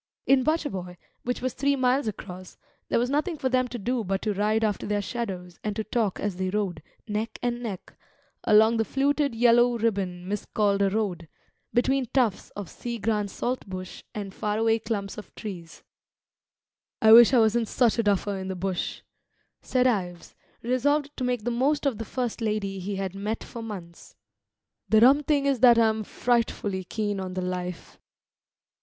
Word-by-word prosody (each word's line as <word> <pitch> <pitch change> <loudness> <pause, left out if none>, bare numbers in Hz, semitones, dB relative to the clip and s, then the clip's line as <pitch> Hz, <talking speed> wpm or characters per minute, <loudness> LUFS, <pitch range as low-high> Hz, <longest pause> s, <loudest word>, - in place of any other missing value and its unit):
In 270 -1 +5
Butcher 310 +1 0
boy, 180 -2 -6 0.2
which 245 0 -3
was 255 - -1
three 280 +2 +1
miles 260 0 +2
across, 185 -3 -7 0.3
there - - +2
was 245 +2 +1
nothing 310 +4 0
for 260 - -1
them 255 0 +2
to 245 - -6
do 240 +2 -1
but 195 0 -2
to 215 - 0
ride 215 +3 +1
after 210 -2 -1
their 205 0 0
shadows 195 -5 -5
and 210 -1 -2
to 220 - -2
talk 215 -4 -1
as 200 -3 -2
they 185 0 -1
rode, 190 -5 -2 0.3
neck 215 +2 -3
and 240 0 -1
neck, 210 -6 -6 0.5
along 220 +1 +5
the 225 - +2
fluted 280 +1 0
yellow 240 +1 +4
ribbon 195 -5 -1
miscalled 205 0 0
a 200 - +4
road, 190 -5 -2 0.4
between 260 +1 +1
tufts 235 -5 0
of 205 -3 -5
sea 235 +6 -6
green 210 -1 0
saltbush 190 -5 -5
and 200 -2 -5
faraway 225 +2 +1
clumps 215 -2 -4
of 210 - -13
trees. 175 -6 -8 1.2
"I 220 - +6
wish 235 +1 +10
I 260 - +4
wasn't 225 0 +3
such 235 0 +2
a - - +6
duffer 205 -1 0
in 190 - -5
the 190 - -3
bush," 185 0 -3 0.6
said 255 -1 +1
Ives, 180 -8 -1 0.3
resolved 285 +4 +1
to 255 - -3
make 250 -3 -1
the 240 - -1
most 280 +5 +1
of 255 -6 0
the 225 - -4
first 245 0 -3
lady 210 -3 -1
he 195 +2 -4
had 190 -1 -3
met 210 +3 -3
for 235 - -8
months. 185 -7 -9 0.7
"The 220 0 +5
rum 270 +5 +7
thing 290 -1 +1
is 275 -3 +2
that 240 -1 +7
I'm 220 -1 +3
frightfully 210 -5 -1
keen 205 0 -2
on 185 -1 -5
the 185 - -1
life." 180 -1 -5
220 Hz, 180 wpm, -26 LUFS, 195-245 Hz, 1.2 s, wish